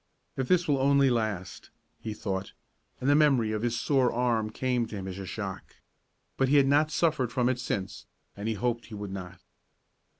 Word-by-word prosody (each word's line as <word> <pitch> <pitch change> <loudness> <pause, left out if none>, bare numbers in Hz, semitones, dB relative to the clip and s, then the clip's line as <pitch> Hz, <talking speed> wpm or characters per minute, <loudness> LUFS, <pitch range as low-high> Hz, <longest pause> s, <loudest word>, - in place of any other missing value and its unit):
"If 130 -1 -3
it 180 -1 +3
will 140 -3 +2
only 140 0 +4
last," 105 -7 -3 0.3
he 110 -1 -5
thought, 95 -2 -4 0.5
and 130 - -3
the 145 - +6
memory 135 -7 +4
of 110 -1 -2
his 120 0 -1
sore 135 -4 +2
arm 115 -3 0
came 125 0 -1
to 110 - -8
him 95 -1 -5
as 95 0 -6
a 95 - -6
shock. 100 -2 -6 0.6
But 135 -1 +2
he 145 - +4
had 140 -2 +6
not 145 +3 +3
suffered 155 -7 +1
from 125 -1 +1
it 130 -1 0
since, 100 -6 -4 0.3
and 100 +2 -5
he 110 - 0
hoped 120 +3 -2
he 110 - -8
would 100 -1 -6
not. 95 -1 -8
120 Hz, 200 wpm, -28 LUFS, 105-135 Hz, 0.6 s, the